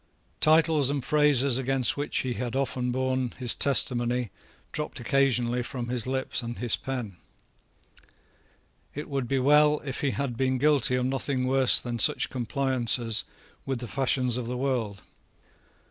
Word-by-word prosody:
Titles 155 -3 +4
and 140 -3 -2
phrases 140 -4 +3
against 130 -2 0
which 145 +1 -1
he 130 -1 -3
had 120 0 -5
often 125 -2 -2
borne 130 -1 -2
his 125 -2 +2
testimony 125 -4 +1 0.4
dropped 150 -3 -5
occasionally 125 -2 +1
from 120 0 -6
his 125 -1 -1
lips 130 -1 -2
and 120 0 -6
his 120 -1 +1
pen. 120 -9 -6 1.8
It 150 - -6
would 135 -4 -3
be 135 - 0
well 150 +3 +4
if 135 -2 -4
he 140 - +1
had 135 -2 -3
been 130 +1 0
guilty 140 -2 +2
of 125 0 -1
nothing 130 0 -2
worse 130 0 +4
than 120 -1 -5
such - - +2
compliances 125 -3 +1 0.4
with 135 -1 -3
the 120 0 -6
fashions 130 -1 0
of 125 -2 -4
the 125 +1 -4
world. 120 -7 -3
130 Hz, 150 wpm, -26 LUFS, 120-135 Hz, 1.8 s, Titles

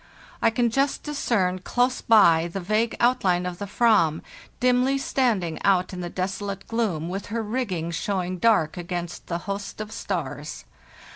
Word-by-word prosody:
I - - +5
can 235 +1 +1
just 275 +3 0
discern 215 -11 0
close 245 +6 0
by 170 -7 +5
the 195 - -3
vague 215 +5 0
outline 195 -8 +2
of 180 -1 -5
the 205 - -4
/vam, 200 -8 +3 0.4
dimly 250 +2 +3
standing 230 -11 0
out 185 -1 +2
in 180 - -5
the 175 - -4
desolate 195 +2 -4
gloom, 205 -9 -1
with 195 +3 -5
her 225 +2 -2
rigging 205 -8 -2
showing 185 +1 -2
dark 170 -8 +3
against 175 0 -5
the 170 - -2
host 200 +1 -5
of 215 0 -5
stars. 150 -8 -5
195 Hz, 155 wpm, -25 LUFS, 175-230 Hz, 0.4 s, I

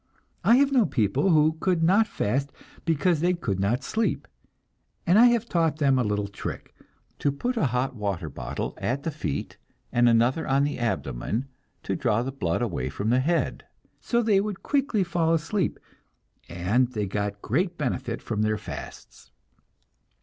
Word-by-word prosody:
I 230 - +6
have 280 +2 +4
known 250 -6 +3
people 120 - +1
who 160 -1 +4
could 175 -2 +1
not 200 +6 +4
fast 135 - -1 0.3
because 165 0 +2
they 180 +3 +2
could 100 - -2
not 105 +6 0
sleep, 225 +1 -1 0.8
and 185 +5 +5
I 245 - +8
have 240 -2 +2
taught 165 -5 +1
them 135 -4 +3
a - - +2
little 105 -1 -1
trick, 100 - -7 0.5
to 145 - +1
put 245 - -2
a 215 -11 +2
hot 125 +2 -1
water 100 -7 -3
bottle 60 -4 -5
at 135 +3 -1
the 165 - -2
feet, 140 - -4 0.3
and 120 0 +4
another 120 +7 +2
on 135 +1 +3
the 145 -2 -2
abdomen, 110 - -2 0.3
to - - -2
draw 120 -7 +1
the 135 - -3
blood 105 -5 -1
away 75 - -2
from 100 +11 -2
the 125 - +4
head. 165 +6 0 0.3
So 235 0 0
they 205 -3 +3
would 205 -2 -5
quickly 275 -8 +1
fall 165 -2 +1
asleep, 170 +3 -1 0.7
and 95 +9 +1
they 105 -3 -1
got 100 +1 -3
great 175 - 0
benefit 125 -4 -3
from 110 -2 -2
their 110 0 +1
fasts. - - -9
135 Hz, 170 wpm, -26 LUFS, 110-175 Hz, 0.8 s, I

